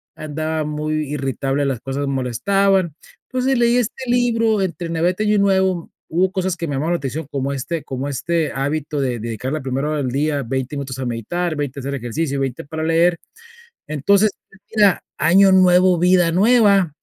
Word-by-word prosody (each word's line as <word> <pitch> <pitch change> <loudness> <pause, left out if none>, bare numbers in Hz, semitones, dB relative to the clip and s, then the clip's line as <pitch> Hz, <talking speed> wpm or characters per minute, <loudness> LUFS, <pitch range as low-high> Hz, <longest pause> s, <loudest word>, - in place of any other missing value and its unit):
Andaba 155 0 -3
muy 150 +1 -2 0.2
irritable, 135 0 -1
las 130 -4 -1
cosas 140 +1 -3
molestaban. 170 - +1 0.4
Entonces, 255 0 0
leí 240 +1 +3
este 250 +2 -2
libro 230 -3 +2
entre 175 -2 -3
Navidad 170 +2 +1
y 215 - +1
Año - - +3
Nuevo, 190 -3 +1 0.2
hubo 185 +3 +1
cosas 185 -2 -1
que 170 - -4
me 145 - -3
llamaban 160 +6 0
la - - +1
atención, 145 +2 -4
como 140 0 -2
este 155 +4 -4
como 135 +2 -4
este 165 +4 -1
hábito 145 +2 -2
de 125 -3 -1
dedicar 115 +5 -4
la 155 - -2
primera 135 +2 -2
hora 155 - -1
del 130 -4 -2
día, 145 0 0
20 130 +3 -3
minutos 130 -2 -5
a 130 - -3
meditar, 155 +9 -2
20 145 -2 -4
a - - -6
hacer 140 +1 -3
ejercicio 140 +4 -3
y - - -2
20 135 -1 -3
para 160 +2 -5
leer. 165 +1 +3 0.7
Entonces, 200 +8 +3 0.5
mira, 205 -3 +4 0.2
año 195 +3 +5
nuevo, 180 -1 +5
vida 180 -1 +4
nueva, 200 -4 +4
155 Hz, 185 wpm, -20 LUFS, 135-185 Hz, 0.7 s, año